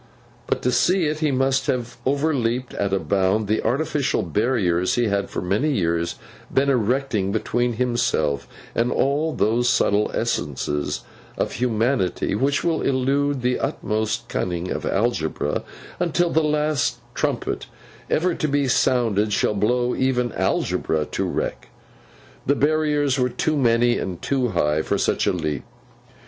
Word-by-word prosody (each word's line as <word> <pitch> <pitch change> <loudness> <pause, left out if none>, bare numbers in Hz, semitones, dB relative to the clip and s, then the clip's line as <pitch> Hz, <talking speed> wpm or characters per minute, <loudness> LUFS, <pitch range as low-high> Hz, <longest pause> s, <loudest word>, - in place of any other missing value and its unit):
But, - - -1
to 125 - +2
see 180 +5 +3
it, 155 0 -1
he 155 -1 +1
must 135 0 +1
have 120 -1 -1
overleaped 130 -4 0
at 100 -1 -1
a 95 - +2
bound 95 +2 +1
the 110 +2 +1
artificial 135 +1 0
barriers 90 - +1
he 120 - +2
had 100 -1 -1
for - - -4
many 105 +12 +1
years 85 -5 0 0.4
been 140 +1 +3
erecting, 120 -4 0
between 120 +3 0
himself 115 - 0 0.3
and 120 +1 +1
all 145 +4 +1
those 120 0 +1
subtle 105 -3 +2
essences 75 +1 -2 0.4
of - - -1
humanity 115 -6 0
which 135 +7 +1
will 165 -2 +1
elude 140 +1 +1
the 125 0 +1
utmost 110 -6 -2
cunning 90 0 -2
of - - -3
algebra 90 -9 0 0.4
until 175 0 +1
the 160 - +3
last 150 -1 +1 0.2
trumpet - - -2 0.4
ever 180 +2 +2
to 155 - -1
be 140 -1 +1
sounded 115 -5 +2
shall 105 - +1
blow 120 +4 +1
even 125 -2 +1
algebra 80 -1 0
to - - -1
wreck. - - -3 0.8
The 140 - +4
barriers 145 -2 +1
were 125 0 +2
too 155 +5 -1
many 120 -2 +3
and 90 -3 -4
too 130 +4 0
high 75 -8 +1
for - - -1
such - - +1
a - - +4
leap. 75 -4 -2
120 Hz, 145 wpm, -23 LUFS, 100-140 Hz, 0.8 s, The